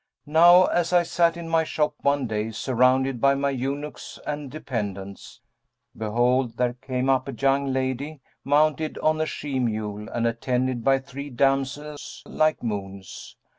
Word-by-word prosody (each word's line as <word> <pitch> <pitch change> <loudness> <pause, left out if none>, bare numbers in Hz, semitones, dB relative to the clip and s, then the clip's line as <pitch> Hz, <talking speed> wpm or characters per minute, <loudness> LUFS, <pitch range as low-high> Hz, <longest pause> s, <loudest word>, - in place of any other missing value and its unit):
Now 175 +4 +7
as 175 -1 0
I 175 -1 +5
sat 170 0 +1
in 170 -1 -7
my 165 0 +2
shop 150 -1 -1
one 140 -1 +1
day 110 -1 -2
surrounded 130 +2 +1
by 140 0 +4
my 140 0 0
eunuchs 135 +1 -5
and 145 -2 -4
dependents, 100 -9 -6 0.5
behold, 120 +2 0
there 125 -1 +1
came 125 +1 -3
up 130 0 +2
a - - -4
young 135 0 +1
lady, 130 +3 -2 0.2
mounted 155 +2 +1
on 155 0 +1
a 155 - 0
she 140 -4 -3
mule 105 -3 -3
and 120 -1 -2
attended 125 +1 -1
by 135 +2 +4
three 140 +2 -8
damsels 135 +3 -2
like 155 -3 0
moons. 100 -4 -6
135 Hz, 150 wpm, -24 LUFS, 120-150 Hz, 0.5 s, Now